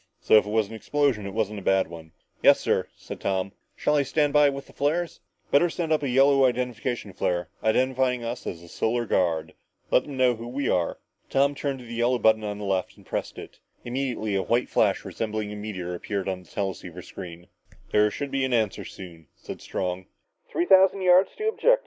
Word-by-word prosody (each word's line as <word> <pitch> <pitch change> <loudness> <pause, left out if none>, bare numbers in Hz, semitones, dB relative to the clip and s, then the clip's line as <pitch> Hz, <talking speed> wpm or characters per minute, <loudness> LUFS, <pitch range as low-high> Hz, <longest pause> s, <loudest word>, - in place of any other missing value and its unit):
"So - - 0
if 105 - +3
it - - -4
was 110 -1 +1
an 110 - -11
explosion, 125 -3 0
it 100 - -7
wasn't 105 -2 -1
a - - -10
bad 95 0 +2
one." 80 -1 -11 0.3
"Yes, - - +6
sir," - - 0
said - - -9
Tom. 95 0 -1 0.2
"Shall 150 - +1
I - - +4
stand 145 +1 +1
by 150 -1 +6
with 140 0 -5
the - - -18
flares?" 160 +4 -1 0.3
"Better 170 +5 +5
send 165 -1 -3
up 155 - +1
a 140 - -1
yellow 135 +1 +5
identification 125 -3 -2
flare, 90 -2 -1
identifying 125 +2 +1
us 120 +1 -5
as 85 - -5
the 85 - -13
Solar 120 +7 -1
Guard. 80 -6 0 0.4
Let - - +4
them 140 -2 -7
know 130 -1 +4
who 115 +1 -7
we 135 +3 -2
are!" 85 -2 +1 0.3
Tom 140 +1 +3
turned 140 -1 -3
to - - -11
the 120 - -8
yellow 120 +2 +2
button 110 -2 +3
on 105 -1 -3
his 105 - -6
left 95 -2 -1
and - - -18
pressed - - -4
it. - - -10 0.3
Immediately 120 -4 -2
a 95 - +1
white 120 +5 0
flash - - +2
resembling 110 -1 -3
a - - -6
meteor 100 -4 -5
appeared 100 +2 -3
on 95 -1 -2
the 90 - -20
teleceiver 90 -3 -4
screen. 85 -2 -9 0.5
"There 105 0 +4
should 140 +5 -5
be 135 -1 0
an 130 -1 0
answer 110 -4 0
soon," 85 -5 -11
said - - -9
Strong. 90 0 -3
110 Hz, 200 wpm, -26 LUFS, 95-130 Hz, 0.5 s, Yes